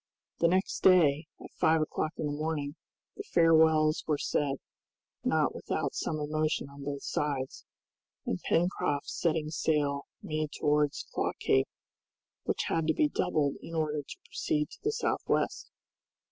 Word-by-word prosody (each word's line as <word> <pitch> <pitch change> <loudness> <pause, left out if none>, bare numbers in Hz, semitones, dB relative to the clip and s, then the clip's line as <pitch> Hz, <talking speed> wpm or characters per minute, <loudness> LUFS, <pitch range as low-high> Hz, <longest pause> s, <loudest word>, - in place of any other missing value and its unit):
The 170 - +5
next 185 +3 +1
day, 160 -5 +5
at - - -11
five 160 0 +4
o'clock 155 +1 -1
in - - -2
the 145 - -1
morning, 145 -1 -2 0.4
the 410 - -6
farewells 160 -2 +5
were 150 -2 +2
said, 140 -1 0 0.7
not - - +2
without - - -2
some 155 - -2
emotion 155 0 0
on 140 0 -10
both 140 -1 -4
sides, 140 -3 -2 0.6
and 90 - -2
Pencroft 165 -4 0
setting 155 -2 0
sail 145 -3 0 0.2
made 155 -1 -2
towards 150 -1 +1
Claw - - 0
Cape, 65 - +2 0.8
which - - 0
had 165 -1 0
to 160 - +2
be 300 - +3
doubled 155 - 0
in 165 - -8
order 155 -2 0
to 140 - -10
proceed 305 -9 -1
to 470 - -12
the 430 - 0
southwest. 450 - -1
155 Hz, 145 wpm, -30 LUFS, 145-165 Hz, 0.8 s, The